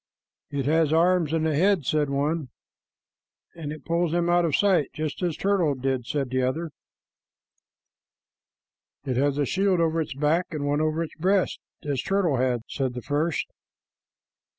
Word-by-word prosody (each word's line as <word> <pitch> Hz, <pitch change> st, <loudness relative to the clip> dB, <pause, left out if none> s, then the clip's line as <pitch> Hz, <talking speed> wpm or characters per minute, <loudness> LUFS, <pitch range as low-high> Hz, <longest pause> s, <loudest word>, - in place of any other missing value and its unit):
"It 140 Hz, -2 st, -2 dB
has 155 Hz, +1 st, +2 dB
arms 170 Hz, -1 st, +3 dB
and 160 Hz, 0 st, +1 dB
a 155 Hz, -, +1 dB
head," 185 Hz, -1 st, +3 dB
said 150 Hz, 0 st, +1 dB
one. 145 Hz, +1 st, -1 dB, 1.0 s
"And 155 Hz, -3 st, -6 dB
it 155 Hz, -1 st, -9 dB
pulls 170 Hz, -1 st, 0 dB
them 175 Hz, 0 st, +1 dB
out 175 Hz, 0 st, +4 dB
of 155 Hz, -, +1 dB
sight 190 Hz, -8 st, +3 dB
just 155 Hz, +2 st, -4 dB
as 170 Hz, -4 st, -1 dB
Turtle 185 Hz, -7 st, +1 dB
did," 130 Hz, -2 st, -2 dB
said 135 Hz, -4 st, -2 dB
another. 130 Hz, +6 st, -1 dB, 2.3 s
"It 130 Hz, -2 st, -1 dB
has 140 Hz, +1 st, +1 dB
a 145 Hz, -, +2 dB
shield 190 Hz, +4 st, +1 dB
over 165 Hz, 0 st, +1 dB
its 155 Hz, -3 st, -5 dB
back 150 Hz, +5 st, +1 dB
and 150 Hz, -4 st, -4 dB
one 145 Hz, +1 st, +1 dB
over 155 Hz, +1 st, 0 dB
its 160 Hz, -, -8 dB
breast, 190 Hz, +3 st, +1 dB, 0.2 s
as 140 Hz, -3 st, -1 dB
Turtle 190 Hz, -8 st, +1 dB
had," 125 Hz, -2 st, +1 dB
said 130 Hz, -2 st, -2 dB
the 125 Hz, -, -6 dB
first. 150 Hz, +3 st, 0 dB
155 Hz, 160 wpm, -25 LUFS, 140-170 Hz, 2.3 s, out